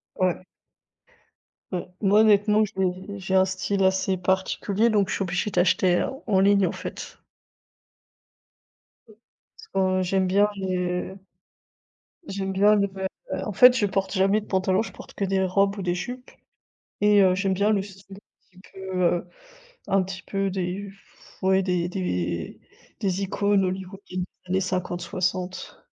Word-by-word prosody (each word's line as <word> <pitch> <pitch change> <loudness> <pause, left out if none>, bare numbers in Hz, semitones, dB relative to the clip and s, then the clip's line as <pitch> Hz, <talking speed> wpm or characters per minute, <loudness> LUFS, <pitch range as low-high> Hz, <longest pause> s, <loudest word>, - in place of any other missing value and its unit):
Ouais. 185 0 0 1.3
Mmh. 180 - -1 0.2
Moi 205 +1 +4
honnêtement 210 0 +4
j'ai 190 0 -3
j'ai 190 0 -4
un 190 0 +5
style 190 +1 -1
assez 190 0 +1
particulier, 190 +4 0
donc 205 -3 +2
je - - -1
suis 195 - -1
obligée 180 +3 -2
d'acheter 180 0 +2 0.2
en 195 -3 +3
ligne 200 -1 +4
en - - -2
fait. - - -8 2.5
Parce 440 - -13
que 185 -1 +1
j'aime 190 +1 +1
bien 205 +3 +3
les 180 -1 -2 1.1
j'aime 195 0 -3
bien 205 +2 +5
le 200 -1 +2
vê 190 0 -6 0.3
heu, - - -3
en 210 - -3
fait, 250 +5 +7
je 205 - +2
porte 195 0 -1
jamais 195 +2 +3
de 210 - -13
pantalon, 190 +1 +1
je - - -6
porte - - -12
que 200 - -2
des 190 0 +1
robes 195 +2 +1
ou - - -4
des 175 -1 -1
jupes, 250 +7 -6 0.7
et 210 -1 +5
heu, 185 -1 +4
j'aime 195 0 0
bien 205 +3 +2
le 200 -2 +2
style 195 0 -13 0.4
un - - -19
petit, - - -16
heu, 185 -2 0 0.6
un 195 0 +3
petit 190 0 -7
peu 195 0 -2
des, 190 +1 -3
pfff 195 0 -21
ouais, 190 0 +3
des 180 -2 0
des 90 - -3 0.4
des 195 -1 -1
icônes 200 0 +1
hollywoodiennes 185 0 -5 0.2
des - - -19
années 190 - +2
50-60. 185 0 -3
190 Hz, 155 wpm, -25 LUFS, 185-200 Hz, 2.5 s, fait